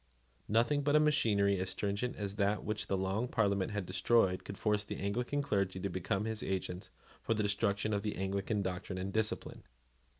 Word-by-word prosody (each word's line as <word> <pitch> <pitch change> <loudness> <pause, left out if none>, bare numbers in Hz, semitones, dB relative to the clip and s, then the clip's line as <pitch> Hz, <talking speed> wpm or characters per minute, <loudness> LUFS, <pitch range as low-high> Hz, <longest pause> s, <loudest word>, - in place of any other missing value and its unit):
Nothing 120 +7 +3
but 145 +1 +2
a - - +7
machinery 105 -10 +3
as 95 0 -1
stringent 100 +6 -2
as 100 -2 -3
that 105 0 +1
which 110 -1 -2
the 95 - 0
Long 95 +6 0
Parliament 100 -5 +1
had 105 -3 -3
destroyed 90 +1 +2
could 100 - -7
force 105 -1 +1
the - - -6
Anglican 125 +8 -1
clergy 100 -8 0
to 100 - -2
become 95 +3 -1
his 110 -1 -3
agents 95 -1 -3 0.3
for 115 - 0
the 105 - 0
destruction 100 +1 0
of 100 - +1
the 105 0 -2
Anglican 100 +2 -1
doctrine 95 0 -4
and 95 +1 -3
discipline. 110 -1 -1
100 Hz, 190 wpm, -34 LUFS, 95-110 Hz, 0.3 s, a